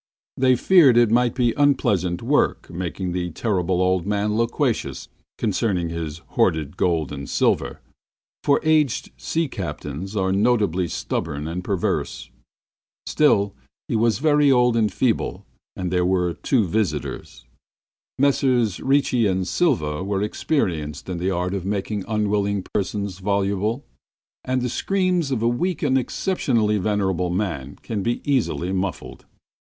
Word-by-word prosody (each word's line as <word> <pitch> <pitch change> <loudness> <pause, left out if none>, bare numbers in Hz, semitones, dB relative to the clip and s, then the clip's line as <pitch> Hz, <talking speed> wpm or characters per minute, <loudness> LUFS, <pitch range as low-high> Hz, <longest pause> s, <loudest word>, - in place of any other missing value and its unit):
They 130 -1 +3
feared 145 -3 +5
it 120 -2 +5
might 120 +1 +2
be 120 -3 +2
unpleasant 100 - +1
work 145 +5 +1
making 90 +1 -4
the 90 0 -2
Terrible 90 -1 0
Old 90 0 +1
Man 105 +1 0
loquacious 115 +2 -1 0.3
concerning 95 -5 0
his 85 -1 -5
hoarded 75 -3 0
gold 80 -5 0
and 70 -2 -6
silver, - - 0 0.6
for 140 - +3
aged 155 -5 +2
sea 165 0 -1
captains 85 - -6
are 95 -2 +1
notably 100 -4 +2
stubborn 75 -2 -3
and 90 +2 -4
perverse. 95 -2 -2 0.7
Still, 100 -10 +2 0.3
he - - -1
was 110 -2 +2
very 145 0 +4
old 125 -2 +4
and 110 -2 +2
very - - -18
feeble, - - -5 0.3
and 90 -2 -3
there 90 -1 +2
were 90 -1 +1
two 120 +1 +1
visitors. 105 +2 -3 0.7
Messrs 130 -6 +2
Ricci 135 -4 +2
and 95 -1 -1
Silva 95 - 0
were 100 0 -1
experienced 90 - -2
in 90 -2 -3
the 90 +2 0
art 90 0 -1
of 95 -3 -3
making 100 +1 -3
unwilling 100 -2 0
persons 100 -1 -2
voluble, 100 +5 -1 0.6
and 130 -1 -1
the - - 0
screams 185 0 0
of 125 -4 -1
a - - +3
weak 170 +10 -1
and 135 -3 +2
exceptionally 115 - 0
venerable 95 -3 0
man 85 -8 -3
can 110 -3 -3
be 120 +4 -1
easily 120 -9 0
muffled. 95 -1 -4
100 Hz, 140 wpm, -22 LUFS, 90-125 Hz, 0.7 s, feared